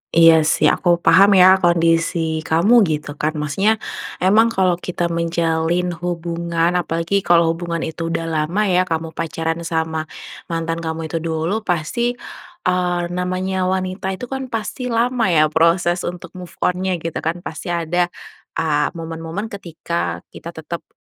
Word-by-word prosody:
Iya 165 -1 +7
sih - - +4
aku 175 -1 +1
paham 195 +4 +6
ya 185 +1 +7
kondisi 165 -1 +2
kamu 200 +10 +5
gitu 150 -1 -3
kan 155 +1 -1
maksudnya 170 +9 +1 0.5
emang 215 +5 +5
kalau 180 -2 +2
kita 175 -1 -2
menjalin 170 +1 0
hubungan 170 -1 -1
apalagi 170 +3 0
kalau 170 -3 +3
hubungan 170 0 -3
itu 165 +1 -4
udah 165 0 -2
lama 165 +5 0
ya 185 -2 +2
kamu 160 0 -2
pacaran 165 0 -3
sama 160 -1 -2 0.4
mantan 165 0 -2
kamu 160 -1 -4
itu 165 - -1
dulu, 165 +6 -1
pasti, 215 +7 -1 0.5
eee, 180 -1 +1
namanya 185 +1 -1
wanita 185 +1 -2
itu 250 +5 -8
kan 265 -1 -3
pasti 240 +2 -4
lama 235 -1 +1
ya 155 -3 +3
proses 175 +2 +2
untuk 180 0 -7
move 180 - -10
on-nya 185 0 0
gitu 165 -1 -3
kan 170 +2 -3
pasti 160 +3 -7
ada 175 +1 0 0.5
a 150 -2 +1
momen-momen 165 +6 -5
ketika 170 -3 -4
kita 170 +1 -9
tetap 160 +2 -7
170 Hz, 145 wpm, -20 LUFS, 165-185 Hz, 0.5 s, Iya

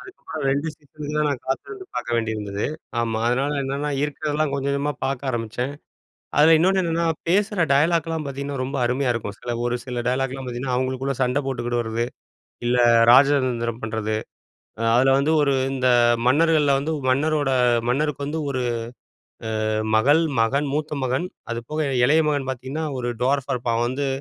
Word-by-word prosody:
அதுக்குமேல 365 - -8
2 145 +4 0
சீசனுக்கு 150 0 -9
தான், 150 - +2
நான் 140 -4 -3
காத்திருந்து 380 - -4
பாக்க - - -4
வேண்டியிருந்தது. 105 -3 -2 0.3
ஆமா, 115 -1 -1
அதனால 135 +4 +1
என்னா 140 +2 -2
இருக்கிறதெல்லாம் 150 0 -1
கொஞ்சம் 140 0 -2
கொஞ்சமாக 145 +1 -2
பாக்க 135 0 -2
ஆரமிச்சேன். 120 +3 -3 0.7
அதில 160 +2 +7
இன்னொன்னு 190 +3 +3
என்னன்னா 170 -1 0 0.2
பேசுற 200 0 +2
டயலாக்லாம் 160 +2 +1
பாத்தீங்கன்னா, 140 0 -4
ரொம்ப 135 +2 -3
அருமையா 125 +1 +1
இருக்கும். 105 -4 -4
சில 120 -1 -4
ஒரு 120 0 0
சில 125 -2 -3
டயலாக்லாம் 135 +1 -2
பாத்தீங்கன்னா, 125 +1 -3
அவுங்களுக்குள்ள 130 +1 -1
சண்டை 125 +3 +1
போட்டுக்கிடுறது 120 -2 -1 0.6
இல்ல, 125 +1 +2 0.3
ராஜதந்திரம் 125 -4 +3
பண்றது. 110 -1 -2 0.6
அ - - -1
அதில 130 +2 +4
வந்து 145 +3 +1
ஒரு 140 -1 +2 0.2
இந்த 130 -1 +1 0.4
மன்னர்கள்ல 150 +1 +4
வந்து 150 +4 -2 0.2
மன்னரோட 145 +1 +1 0.4
மன்னருக்கு 145 +2 0
வந்து 155 +3 -3
1 130 -2 -2 1.1
அ - - 0 0.3
மகள், 145 +8 +4 0.2
மகன், 140 +6 +1
மூத்த 150 0 -2
மகன் 130 +6 0 0.3
அதுபோக 120 +7 -3 0.2
இளைய 155 +5 +4
மகன் 145 -3 -1
பாத்தீங்கன்னா 130 +5 -4
ஒரு 120 0 -2
ட்வார்ஃபா 135 +1 +1
இருப்பான். 120 -1 -1
அவன் 120 - +1
வந்து 140 +2 -2
135 Hz, 150 wpm, -23 LUFS, 125-150 Hz, 1.1 s, அதில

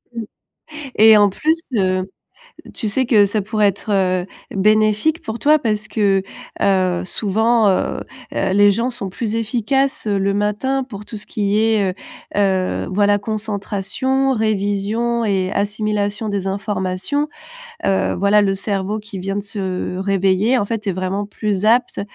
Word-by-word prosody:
Mmh 230 - -3 0.8
et 220 0 +8
en 205 -1 +5
plus, 315 - 0 0.2
heu, 185 -2 +1 0.7
tu 220 - -2
sais 260 +5 0
que 220 -4 +5
ça 205 +2 -1
pourrait 210 +1 +2
être, 200 +2 -3
heu, 185 -2 +1 0.3
bénéfique 215 - +2
pour 220 +1 -5
toi. 305 +1 +4
Parce 215 -5 -1
que, 195 -3 +1 0.4
heu, 185 -3 +2
souvent, 220 +3 +2
heu 190 - 0 0.4
heu, 190 - 0
les 205 +1 +6
gens 230 +5 0
sont 200 -6 -6
plus 220 +3 -3
efficaces, 240 +3 0
heu, 205 -1 +1
le 195 0 +1
matin 210 +7 0
pour 210 -5 -9
tout 220 - -9
ce 205 - -12
qui 205 0 0
est, 220 -3 +2
heu - - -8 0.4
heu, 190 -2 +1
voilà, 205 +1 +3
concentration, 215 +5 -1
révision 215 +2 0
et 190 -3 0
assimilation 210 +1 -1
des 200 -2 -2
informations, 195 +8 -2 0.6
heu, 195 -1 +1
voilà, 200 +3 +4
le 195 -1 +1
cerveau 195 +1 -2
qui 210 -2 -8
vient 195 +2 -3
de 205 - -2
se 190 -3 -4
réveiller, 195 +4 +2
en 205 - 0
fait, 220 0 -4
est - - +2
vraiment 185 +2 -2
plus 205 -2 -2
apte 235 +3 +2
205 Hz, 155 wpm, -19 LUFS, 195-220 Hz, 0.8 s, et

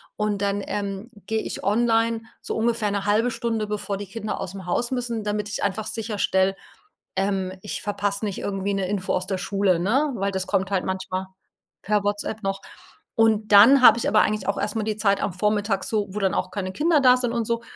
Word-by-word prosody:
und 210 -1 -1
dann, 200 0 0
ähm, 200 +2 -4 0.2
gehe 220 0 0
ich - - -5
online 225 +1 +2 0.2
so - - -4
ungefähr 225 -2 +1
'ne 200 0 -2
1/2 220 +4 +2
Stunde, 225 -3 -2
bevor 205 -1 -3
die 205 0 -7
Kinder 215 +2 -5
ausm 190 0 -6
Haus 240 +8 -1
müssen, 240 -4 -2
damit 210 0 -2
ich - - -4
einfach 205 +2 -1
sicherstelle, 200 -3 0 0.6
ähm, 195 -1 0
ich 210 - -5
verpasse 205 0 -2
nicht 205 -3 -2
irgendwie 200 0 -2
'ne 195 -1 -1
Info 195 -1 -2
aus 185 0 -1
der 190 -2 -2
Schule, 195 -2 +1
ne? 265 - +1
Weil 200 -1 -1
das 190 -1 -3
kommt 190 +1 0
halt 190 -2 0
manchmal 190 0 -3 0.6
per 210 +1 +1
WhatsApp 205 +1 -2
noch. 195 0 -2 0.6
Und 220 -2 +3
dann 240 +7 +8
habe 240 - +8
ich 235 - -1
aber 215 - +4
eigentlich 215 0 0
auch 200 - 0
erst 205 +1 -1
mal 220 - 0
die 215 0 -2
Zeit 200 -2 +2
am 195 - -1
Vormittag 205 +1 0
so, 210 -2 -1
wo 210 - -3
dann 190 -2 +1
auch - - -2
keine 185 -2 -4
Kinder 310 - +3
da 250 -2 +7
sind 245 -2 0
und 235 -2 -1
so. 230 0 -1
205 Hz, 215 wpm, -24 LUFS, 195-225 Hz, 0.6 s, dann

